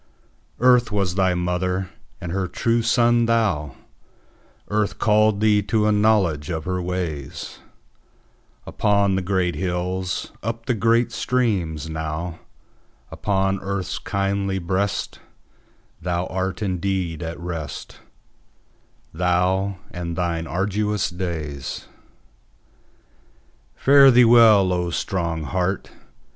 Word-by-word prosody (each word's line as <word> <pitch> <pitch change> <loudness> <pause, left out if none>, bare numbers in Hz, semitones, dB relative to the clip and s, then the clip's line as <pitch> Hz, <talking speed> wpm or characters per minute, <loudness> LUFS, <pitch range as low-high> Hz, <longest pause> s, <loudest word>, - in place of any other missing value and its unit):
Earth 125 -2 +4
was 100 -4 0
thy 95 -1 +2
mother, 90 +1 -1 0.3
and 85 -3 -6
her 95 0 -1
true 115 +6 0
son 120 0 +3
thou:Earth 105 - -3
called 105 -1 +3
thee 105 -1 +4
to 105 +2 0
a 105 - +3
knowledge 105 -8 +2
of 80 -3 -3
her 90 -1 -2
ways, 85 -6 -5 1.1
Upon 100 -1 +1
the 95 - 0
great 90 -1 0
hills, 90 0 -3
up 115 +1 -4
the 125 - +1
great 115 +2 +2
streams: 100 - -1
nowUpon 80 +2 -4 1.2
earth's 100 -2 -3
kindly 100 0 -1
breastThou 95 +2 -2 0.8
art 90 +2 -2
indeed 90 -3 -2
at 85 0 -5
rest:Thou, 90 +3 -4
and 85 -1 -5
thine 85 -2 -2
arduous 100 +4 -1
days. 80 -6 -5 1.9
Fare 140 0 +7
thee 125 -1 +6
well, 110 -5 +6
O 90 -1 -1
strong 85 -2 -2
heart! 90 +4 -2
95 Hz, 100 wpm, -22 LUFS, 85-105 Hz, 1.9 s, Fare